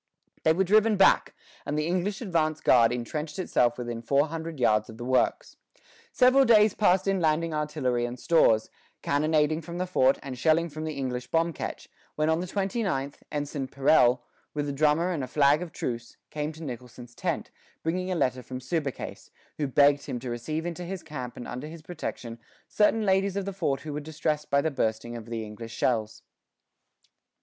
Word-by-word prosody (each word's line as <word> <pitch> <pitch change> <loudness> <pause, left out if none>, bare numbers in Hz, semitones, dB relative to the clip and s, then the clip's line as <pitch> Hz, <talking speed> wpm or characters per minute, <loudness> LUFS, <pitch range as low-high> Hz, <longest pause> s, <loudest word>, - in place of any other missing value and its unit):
They 160 - +4
were 190 +4 +2
driven 215 +3 +4
back, 195 - +4 0.3
and 150 - -3
the 150 - 0
English 185 +5 -1
advance 160 -7 0
guard 115 -2 +5
intrenched 150 +6 -4
itself 120 -10 +1
within 120 -2 -4
four 140 +5 +2
hundred 165 -2 -6
yards 110 -3 +2
of 110 - -10
the 120 - -6
works. 130 0 0 0.5
Several 255 +2 +5
days 215 -4 +5
passed 190 -2 +2
in 195 -1 +2
landing 160 0 +1
artillery 150 -6 -1
and 120 +1 -7
stores, 115 -10 +3 0.3
cannonading 155 +2 +2
from 170 +2 -7
the 180 - -1
fort 135 -7 +3
and 130 -3 -6
shelling 165 +3 +3
from 155 +1 -6
the 155 -1 -4
English 125 -2 -3
bomb 165 +1 +1
ketch, - - -6 0.3
when 155 +1 +1
on 160 - +1
the 180 - -4
twenty 195 +4 -1
ninth, 140 -8 -2
Ensign 145 -2 -3
Perelle, 130 -3 +3 0.3
with 145 -1 -1
a - - -1
drummer 155 +5 +2
and 155 -6 -2
a - - -4
flag 145 +3 +3
of 175 -2 -6
truce, 120 -4 -5
came 150 0 -3
to 160 +1 -10
Nicholson's 125 -2 -8
tent, - - -3 0.3
bringing 180 +3 -1
a - - 0
letter 130 -5 0
from 125 +1 -7
Subercase, 140 0 -4 0.3
who 145 - 0
begged 140 +1 +4
him 125 - -3
to 125 -1 -5
receive 155 +8 -3
into 175 0 -4
his 185 +1 -6
camp 130 -6 -7
and 120 - -7
under 125 +4 -6
his 160 0 -10
protection 125 -8 -6 0.3
certain 215 +1 +2
ladies 195 0 +2
of 200 -1 -2
the 200 - -4
fort 140 -7 -1
who 150 0 -6
were 150 - -2
distressed 150 0 -3
by 140 0 +3
the 160 - -1
bursting 120 -2 -2
of 115 -1 -8
the 115 -1 -4
English 115 +2 -9
shells. 110 -3 -1
150 Hz, 195 wpm, -27 LUFS, 125-170 Hz, 0.5 s, guard